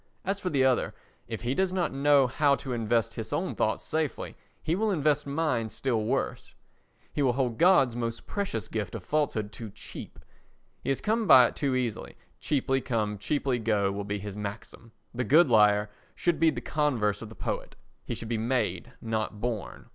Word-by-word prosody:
As 195 Hz, +1 st, -1 dB
for 185 Hz, -, -2 dB
the 135 Hz, -5 st, +2 dB
other—if 120 Hz, -3 st, -2 dB
he 120 Hz, +2 st, 0 dB
does 190 Hz, +5 st, +1 dB
not 185 Hz, -5 st, 0 dB
know 140 Hz, 0 st, +4 dB
how 140 Hz, +3 st, +3 dB
to 130 Hz, -2 st, -5 dB
invest 115 Hz, -1 st, 0 dB
his -, -, -6 dB
own -, -, -1 dB
thoughts -, -, 0 dB
safely 155 Hz, -2 st, -2 dB, 0.3 s
he 160 Hz, -, 0 dB
will 220 Hz, +3 st, +1 dB
invest 150 Hz, -5 st, +1 dB
mine 140 Hz, -6 st, 0 dB
still 120 Hz, -1 st, -1 dB
worse; -, -, -2 dB, 0.6 s
he 145 Hz, -, -1 dB
will 130 Hz, -3 st, +3 dB
hold 125 Hz, -3 st, -1 dB
God's 165 Hz, -9 st, +5 dB
most 115 Hz, -1 st, -3 dB
precious 190 Hz, -, -3 dB
gift 105 Hz, -5 st, -4 dB
of -, -, -6 dB
falsehood 125 Hz, -9 st, -1 dB
too 110 Hz, +2 st, -8 dB
cheap; -, -, -9 dB, 0.7 s
he -, -, -3 dB
has 135 Hz, -, 0 dB
come 220 Hz, 0 st, 0 dB
by 125 Hz, -7 st, +9 dB
it -, -, -2 dB
too 135 Hz, -3 st, 0 dB
easily; 125 Hz, -4 st, -3 dB, 0.2 s
cheaply 135 Hz, -2 st, 0 dB
come, 105 Hz, -5 st, -1 dB
cheaply 135 Hz, +2 st, 0 dB
go 105 Hz, -3 st, +1 dB
will 100 Hz, +1 st, -4 dB
be 100 Hz, +1 st, -3 dB
his 100 Hz, 0 st, -6 dB
maxim. 105 Hz, +2 st, -7 dB, 0.2 s
The 125 Hz, +1 st, -1 dB
good 155 Hz, +1 st, +5 dB
liar 105 Hz, -1 st, +5 dB, 0.3 s
should 170 Hz, -4 st, 0 dB
be 165 Hz, 0 st, +5 dB
the -, -, -3 dB
converse 120 Hz, -10 st, 0 dB
of 110 Hz, -, -7 dB
the 110 Hz, -, -12 dB
poet; -, -, -4 dB, 0.3 s
he -, -, -4 dB
should 115 Hz, -, -5 dB
be 115 Hz, -1 st, -1 dB
made, 120 Hz, 0 st, -1 dB
not 110 Hz, -2 st, -2 dB
born. 115 Hz, -2 st, -4 dB
125 Hz, 190 wpm, -28 LUFS, 110-145 Hz, 0.7 s, by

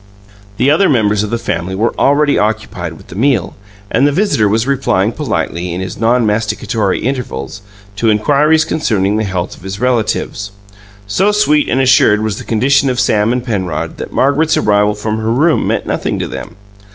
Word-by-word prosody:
The 140 Hz, -, +3 dB
other 185 Hz, +6 st, +3 dB
members 105 Hz, -6 st, +2 dB
of 105 Hz, -, -3 dB
the 115 Hz, -, -1 dB
family 95 Hz, -5 st, -3 dB
were 110 Hz, +4 st, 0 dB
already 145 Hz, +1 st, +2 dB
occupied 105 Hz, -6 st, -2 dB
with 80 Hz, -, -16 dB
the -, -, -10 dB
meal, 115 Hz, -5 st, 0 dB, 0.4 s
and 135 Hz, +6 st, +3 dB
the -, -, +2 dB
visitor 145 Hz, -, +1 dB
was 110 Hz, +3 st, +1 dB
replying 125 Hz, -7 st, +1 dB
politely, 85 Hz, -5 st, -3 dB
in -, -, -4 dB
his 95 Hz, 0 st, -6 dB
non 115 Hz, +1 st, +2 dB
masticatory 105 Hz, -1 st, -1 dB
intervals, 100 Hz, -, -4 dB, 0.4 s
to 115 Hz, +2 st, +1 dB
inquiries 150 Hz, +8 st, +3 dB
concerning 105 Hz, -11 st, 0 dB
the 110 Hz, -, 0 dB
health 95 Hz, -3 st, -3 dB
of -, -, -18 dB
his 95 Hz, +1 st, -6 dB
relatives. 110 Hz, -4 st, -1 dB, 0.5 s
So 190 Hz, -, +1 dB
sweet 150 Hz, -8 st, +2 dB
and 130 Hz, -, +1 dB
assured 125 Hz, -5 st, +4 dB
was 110 Hz, -2 st, -2 dB
the -, -, -7 dB
condition 135 Hz, +5 st, +2 dB
of 125 Hz, -1 st, -1 dB
Sam 110 Hz, -2 st, +2 dB
and 125 Hz, 0 st, -1 dB
Penrod 90 Hz, -8 st, -3 dB
that -, -, -7 dB
Margaret's 145 Hz, +4 st, +2 dB
arrival 105 Hz, 0 st, +2 dB
from 110 Hz, +1 st, -3 dB
her 110 Hz, +1 st, -1 dB
room 155 Hz, +7 st, +2 dB
meant -, -, -1 dB
nothing -, -, -2 dB
to -, -, -3 dB
them. 110 Hz, -, -8 dB
110 Hz, 185 wpm, -14 LUFS, 100-135 Hz, 0.5 s, assured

